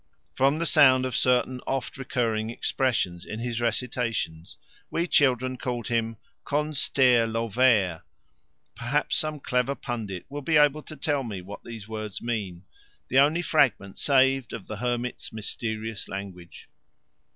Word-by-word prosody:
From 135 +3 +2
the 170 - -1
sound 130 -5 +6
of 130 -2 -3
certain 125 0 +2
oft 135 -1 -2
recurring 115 -5 -1
expressions 115 -8 -1
in 110 - -6
his 120 0 -3
recitations 115 -8 -2 0.3
we 170 - 0
children 130 -5 +2
called 120 -2 -4
him 115 -1 -1 0.3
"Con 150 +1 -1
stair 125 -4 +3
Lo 115 +1 -2
vair"; 105 -8 +3 0.7
perhaps 140 +6 0
some 155 -1 0
clever 125 +1 0
pundit 110 -10 -5
will 145 +1 -6
be 155 +2 +2
able 150 0 +4
to 155 - -9
tell 145 -2 0
me 110 -7 -5
what 95 +3 -10
these 115 -3 -9
words 110 -2 -5
mean 100 -7 -4 0.5
the 130 - +4
only 155 +5 +4
fragment 130 - +1
saved 135 -2 +3
of 115 -5 -6
the 110 - -6
hermit's 120 +1 -3
mysterious 110 0 -4
language. 95 -4 -8
120 Hz, 145 wpm, -26 LUFS, 110-135 Hz, 0.7 s, sound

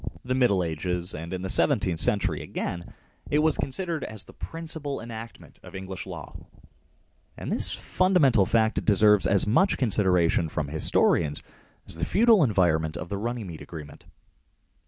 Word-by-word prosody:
39 - - -9
the 130 - -1
Middle 120 -8 +2
Ages 85 +2 -2
and 85 +2 -7
in 95 -1 -5
the - - -3
seventeenth 85 -3 +2
century - - +1
again 85 0 -6 0.4
it 150 - +1
was 155 0 +1
considered 165 +3 -3
as 110 -2 -3
the - - -16
principal 160 -4 -5
enactment 115 0 -10
of - - -13
English 95 0 -7
law, 85 -5 -9 1.0
and - - -6
this - - +6
fundamental 150 - +2
fact 110 -1 +1
deserves 105 -1 +4
as 100 -1 +3
much 185 - +2
con 125 - 0
sideration 90 -5 +2
from 75 -2 -4
historians 75 0 +1 0.4
as - - +2
the 85 - -5
feudal 225 -4 +4
environment 85 - +1
of 85 - -7
the 100 - -3
Runnymede 110 -8 -5
agreement. 75 -3 -11
100 Hz, 155 wpm, -25 LUFS, 85-130 Hz, 1.0 s, this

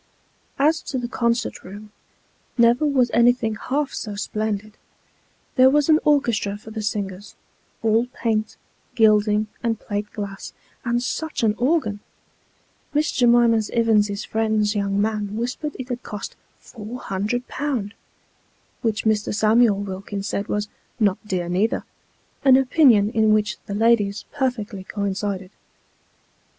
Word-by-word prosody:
As 310 +3 +3
to 265 - -4
the 245 -1 -3
concert 235 0 -1
room, 205 +3 -11 0.7
never 235 +5 +4
was 255 -4 +2
anything 235 -1 +3
half 275 +6 -2
so 210 -2 -5
splendid. 215 0 -3 0.8
There 260 0 +7
was 295 +2 +2
an 310 0 +6
orchestra 235 -9 +1
for 220 +1 -12
the 220 0 -4
singers, 205 -2 -4 0.5
all 225 +2 +2
paint, 220 -4 -2 0.4
gilding, 215 -2 +4 0.2
and 225 -2 -1
plate 205 -1 -4
glass; 200 -2 -6 0.3
and 240 0 0
such 315 +1 -3
an 215 -2 +3
organ! 245 -6 +1 1.0
Miss 305 +2 +2
J'mima 235 -3 +3
Ivins's 210 -3 +2
friend's 220 -1 +1
young 200 -1 0
man 210 -1 -1
whispered 250 +6 -3
it 260 -1 -7
had 245 -1 -3
cost 210 -2 -7 0.2
" - - -39
four 230 +2 -7
hundred 210 +6 -2
pound," 255 -8 -3 0.9
which 225 -2 -1
Mr. 215 -1 +1
Samuel 220 0 +4
Wilkins 200 +1 -5
said 200 - -2
was 210 0 -2 0.3
"not 200 -4 +2
dear 180 -3 -2
neither; 190 +6 0 0.3
" - - -39
an 265 -2 +7
opinion 250 -6 +4
in 220 -1 +3
which 210 -3 0
the 200 - -4
ladies 215 -2 +2
perfectly 230 -7 -2
coincided. 200 -1 -3
220 Hz, 135 wpm, -22 LUFS, 205-245 Hz, 1.0 s, There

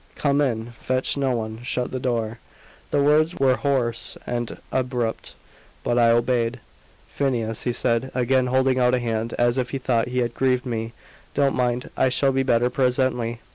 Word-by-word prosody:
"Come 140 0 +1
in. 120 -4 -1
Fetch 130 0 0
no 135 -3 0
one. 110 0 -4
Shut 125 0 -2
the 130 - -3
door." 115 -3 -2 0.5
The 145 - +2
words 155 +4 +3
were 135 -1 +3
hoarse 125 -5 -1
and 120 -1 -3
abrupt, 125 -3 -2 0.5
but 120 0 +1
I 115 -1 +5
obeyed. 120 +1 +1 0.5
"Phineas," 115 -5 -2
he 125 - +1
said, 120 +1 0
again 130 0 +2
holding 130 0 +2
out 125 0 +4
a - - 0
hand, 115 -1 -2
as 120 +1 +2
if 125 -1 -1
he 135 - -2
thought 120 -3 0
he 125 +1 -4
had 120 - -5
grieved 130 -1 +1
me; 115 -2 -3 0.4
"don't 140 -1 +2
mind. 125 0 -1
I 130 - +3
shall 135 +2 +2
be 135 0 +1
better 125 -1 +2
presently. 125 -3 0
125 Hz, 175 wpm, -23 LUFS, 120-130 Hz, 0.5 s, I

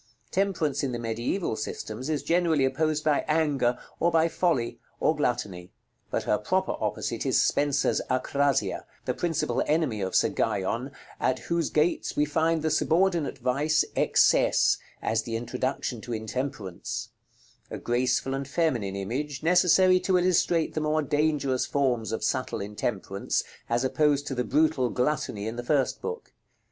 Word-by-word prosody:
Temperance 190 -7 0
in 135 -3 -2
the - - -2
mediæval 120 - -2
systems 110 +4 -5
is 150 -3 -1
generally 165 -3 +2
opposed 155 +3 0
by 150 -2 +2
Anger, 145 -6 +1 0.2
or 170 - +3
by 165 -1 +3
Folly, 165 -9 0 0.2
or 155 - +2
Gluttony: 105 -11 -2 0.4
but - - -1
her - - +1
proper - - 0
opposite - - -2
is - - +2
Spenser's 145 0 +2
Acrasia, 140 +2 0 0.2
the - - 0
principal 165 -3 -1
enemy 150 -9 +1
of 95 -1 -2
Sir - - +4
Guyon, 115 +7 -1 0.3
at 130 - +1
whose 170 +7 -1
gates 155 +3 0
we 150 - +3
find 160 +1 +1
the 160 - +1
subordinate 170 0 +1
vice 150 +5 +1
"Excesse," - - +3 0.2
as 110 0 +1
the 115 0 -5
introduction 125 0 -3
to 120 +1 -6
Intemperance; 110 -4 -4 0.6
a - - -5
graceful 125 +2 0
and 135 0 -3
feminine 130 - 0
image, 130 +9 -4
necessary 180 +2 +5
to 185 0 +2
illustrate 175 -2 +2
the 155 - -1
more 155 0 +1
dangerous 145 -3 0
forms 125 -6 0
of 110 - -3
subtle 130 +3 -1
intemperance, 100 -1 -2 0.3
as 120 +2 +1
opposed 145 +1 +2
to 140 - -3
the 125 -1 -1
brutal 145 -2 +2
"Gluttony" 125 -6 -1
in 110 +2 -4
the 120 - -4
first 135 +1 0
book. 460 0 -6
140 Hz, 150 wpm, -27 LUFS, 120-160 Hz, 0.6 s, necessary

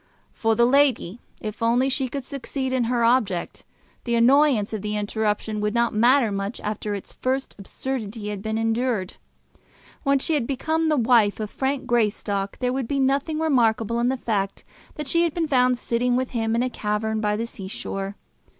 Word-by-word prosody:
For 225 -1 +1
the 235 - +4
lady, 250 -6 +2 0.2
if 215 0 -6
only 240 +3 +3
she 270 0 0
could 275 +2 -5
succeed 265 0 -4
in 255 -2 +1
her 235 0 +1
object, 225 -7 +1 0.4
the 235 -1 0
annoyance 245 -2 +4
of 215 - -3
the 210 +1 -2
interruption 210 0 -1
would 210 +1 -1
not 235 0 +2
matter 235 +1 +4
much 200 +2 -3
after 210 0 -3
its 200 - -8
first 265 +1 -2
absurdity 215 0 -4
had 205 -2 -5
been 220 +1 -2
endured. 225 -3 -1 0.8
When 275 -2 +3
she 295 +4 0
had 275 -6 0
become 315 +4 0
the 305 - +2
wife 225 -4 +3
of 215 -1 -4
Frank 270 0 -2
Greystock 210 -4 0
there 250 -1 -1
would 260 -3 -2
be 280 +2 -1
nothing 275 +4 +1
remarkable 235 -7 +2
in 240 +1 +2
the 265 - 0
fact 200 -5 -2 0.3
that 300 -2 -5
she 335 +5 +3
had 340 -3 +1
been 335 -2 0
found 250 -3 +3
sitting 240 +1 0
with 255 0 -1
him 225 -2 0
in 235 - +2
a 255 - 0
cavern 215 0 -2
by 210 -1 +1
the 225 +2 -2
sea 220 -5 -8
shore. 195 0 -5
235 Hz, 190 wpm, -24 LUFS, 210-265 Hz, 0.8 s, the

